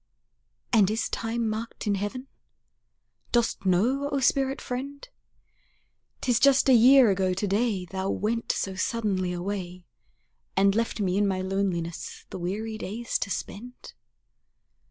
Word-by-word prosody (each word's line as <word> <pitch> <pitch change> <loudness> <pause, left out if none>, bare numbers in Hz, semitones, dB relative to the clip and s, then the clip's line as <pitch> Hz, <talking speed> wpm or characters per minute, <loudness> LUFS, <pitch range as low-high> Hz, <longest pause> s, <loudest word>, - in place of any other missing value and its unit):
And 205 -4 +5
is 220 +2 -1
time 230 0 -2
marked 220 +2 -4
in 205 - +1
heaven? 205 +6 -3 1.1
Dost 235 -4 0
know, 250 +11 +2
O 280 - 0
spirit 270 +1 +1
friend, 280 - -6 1.1
'Tis 245 -2 +2
just 275 0 +5
a 265 - +6
year 250 0 +7
ago 185 -1 0
to 200 - -1
day 200 -2 0
Thou 190 +2 -4
went 230 +4 -1
so 195 - -2
suddenly 190 -2 -1
away, 180 0 -5 0.7
And 195 0 +4
left 230 +1 -1
me 190 -1 +1
in 205 - +2
my 190 -1 -1
loneliness 180 -3 -3
the - - -6
weary 215 +5 -4
days 230 +5 -3
to 200 - -3
spend? 240 +6 -7
210 Hz, 135 wpm, -26 LUFS, 190-235 Hz, 1.1 s, year